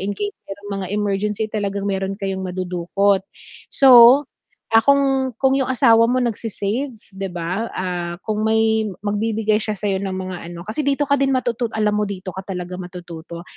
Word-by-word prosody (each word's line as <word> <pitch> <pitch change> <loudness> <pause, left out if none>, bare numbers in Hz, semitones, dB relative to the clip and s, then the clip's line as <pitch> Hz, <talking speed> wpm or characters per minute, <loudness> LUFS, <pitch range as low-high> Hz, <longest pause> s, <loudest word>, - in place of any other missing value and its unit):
in 200 +2 -2
case 410 - -2 0.2
merong 200 +1 -8
mga - - -4
emergency 210 +1 -1
talagang 200 -2 -2
meron 195 0 -2
kayong 190 -1 -3
madudukot. 185 +2 0 0.5
So, 255 0 +8 0.5
ah, 225 - +9
kung 270 -3 +2
kung 265 0 +3
yung 265 - 0
asawa 230 -3 +5
mo 255 0 +1
nagse-save 230 +2 -3 0.2
'di 195 0 -4
ba, 180 +6 -2
ah, 175 -2 -3
kung 215 0 -1
may 220 0 +2 0.2
magbibigay 215 +1 0
siya 215 0 -3
sa'yo 195 -2 -1
ng 190 -1 -3
mga 185 -1 -5 0.2
ano 170 0 -8
kasi 280 +6 -3
dito 280 +1 +2
ka 280 - +4
din 270 -1 +2
matutut 240 -2 -1
alam 210 -1 +1
mo 210 - 0
dito 190 -1 -6
ka 190 - -6
talaga 180 -1 -5
matututo. 175 -2 -9
210 Hz, 175 wpm, -20 LUFS, 190-235 Hz, 0.5 s, ah